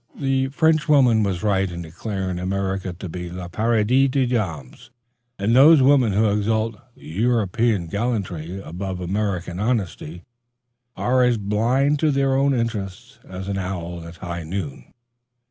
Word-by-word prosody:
The 135 -1 0
Frenchwoman 145 -5 +3
was 95 -3 -1
right 95 -2 +1
in 85 0 -6
declaring 95 +2 -4
America 95 0 -2
to 90 +2 -8
be 90 +1 -6
le 90 0 -6
paradis 115 +6 +2
des 130 0 +1
dames, 105 - -4 0.5
and 105 +4 +1
those 145 +2 +7
women 130 -6 +4
who 110 +3 +3
exalt 110 +2 0 0.2
European 110 +1 0
gallantry 95 -4 -3
above 90 +2 -5
American 90 -1 -2
honesty 95 -7 -2 0.7
are 125 +1 +1
as 125 -1 +3
blind 120 +8 +1
to 155 - +2
their 135 -1 +1
own 140 +1 +2
interests 115 +1 -4
as 95 +1 -7
an 100 -1 -2
owl 90 -2 -5
at 85 - -10
high 85 0 -6
noon. 80 -6 -5
105 Hz, 140 wpm, -22 LUFS, 90-125 Hz, 0.7 s, those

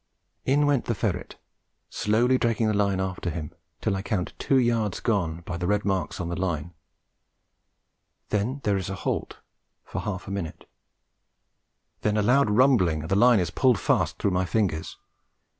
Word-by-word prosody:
In 145 +3 +3
went 145 -4 +2
the 115 - -1
ferret, 95 -4 -3 0.5
slowly 120 +5 +2
dragging 115 -1 +1
the 110 - +2
line 100 -2 +1
after 95 -1 -2
him 80 -2 -5 0.3
till 105 -3 0
I 95 - -2
count 100 -3 -2
two 135 - +2
yards 115 -5 +1
gone 90 -8 -1
by 85 0 -5
the 90 0 -2
red 105 +1 +1
marks 95 -2 -1
on 90 - -3
the 85 - -3
line; 85 -2 -2 1.6
then 115 +7 -1
there 100 -2 +2
is 95 0 -4
a 95 - -3
halt - - -2 0.5
for - - -4
half 95 -3 -5
a - - -5
minute, 95 -5 -5 1.3
then 105 0 +1
a 105 - +2
loud 125 +2 +4
rumbling 105 - +3
and 80 - -7
the - - +4
line 120 +1 +6
is 85 -3 -1
pulled 125 +4 +3
fast - - +1
through 100 - 0
my 90 0 +1
fingers. 90 -5 -1
100 Hz, 175 wpm, -26 LUFS, 90-115 Hz, 1.6 s, line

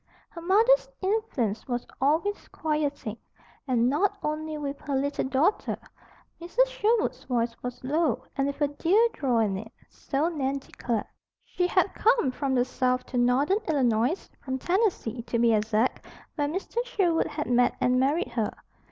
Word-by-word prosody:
Her 335 - -9
mother's 445 +9 +4
influence 375 - -1
was 245 -1 -2 0.2
always 320 +9 +1
quieting, 290 -8 -2 0.5
and 245 -2 +2
not 375 +10 +1
only 305 0 -2
with 285 -1 -4
her 285 -2 -2
little 280 +2 0
daughter. 275 +9 +1 0.6
Mrs. 395 +9 +2
Sherwood's 475 -2 0
voice 235 -2 0
was 250 0 -6
low, 280 -2 +1
and 275 0 +1
with 280 - -4
a 290 - +4
dear 345 +10 +3
drawl 255 -5 0
in 205 -4 +1
it, 220 +2 -10 0.2
so 285 +3 -1
Nan 280 -5 -1
declared. 240 -4 -3 0.4
She 360 - 0
had 370 +1 +2
come 455 - +3
from 270 0 -1
the 245 -1 +3
South 255 0 0
to 255 - -4
Northern 270 - +3
Illinois, 255 - +1 0.2
from 260 -1 -2
Tennessee, 350 - 0
to 235 0 -2
be 235 -1 +4
exact, 215 +3 +1 0.3
where 290 -2 -1
Mr. 385 +9 -2
Sherwood 375 -9 +1
had 300 0 -4
met 245 0 +3
and 250 0 +3
married 295 +9 +1
her. - - -1
280 Hz, 160 wpm, -27 LUFS, 250-350 Hz, 0.6 s, mother's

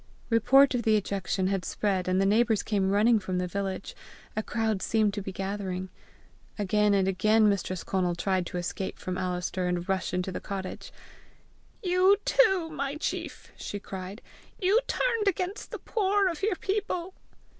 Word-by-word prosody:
Report 265 +5 +5
of 245 - 0
the 220 -1 +3
ejection 195 -2 -1
had 190 -1 0
spread, 190 -3 -1
and 185 +1 +2
the 195 - +3
neighbours 220 +1 +3
came 195 -3 0
running 215 +3 +4
from 185 -2 -3
the 180 - 0
village. 195 +1 -4 0.4
A 215 - 0
crowd 220 -3 -1
seemed 215 -2 +2
to 205 - -3
be 195 - -5
gathering. 190 -1 -4 0.7
Again 210 0 +2
and 190 -1 +2
again 215 +3 +3
Mistress 185 -3 -1
Conal 180 -2 0
tried 185 0 0
to - - -5
escape 185 +2 -4
from 185 - -4
Alister 180 0 -2
and 180 0 -2
rush 190 -1 -1
into 180 +1 -2
the - - -4
cottage. 190 -2 -6 0.9
"You 370 +2 +4
too, 385 -10 +3
my 280 -2 -3
chief!" 305 - -4
she 205 - -5
cried. 190 +2 -8 0.4
"You 395 +3 +4
turned 460 -4 0
against 380 +2 -1
the - - -5
poor 405 -2 +1
of 335 -1 -5
your 405 -1 +1
people!" 380 -1 -2
205 Hz, 165 wpm, -28 LUFS, 190-280 Hz, 0.9 s, Report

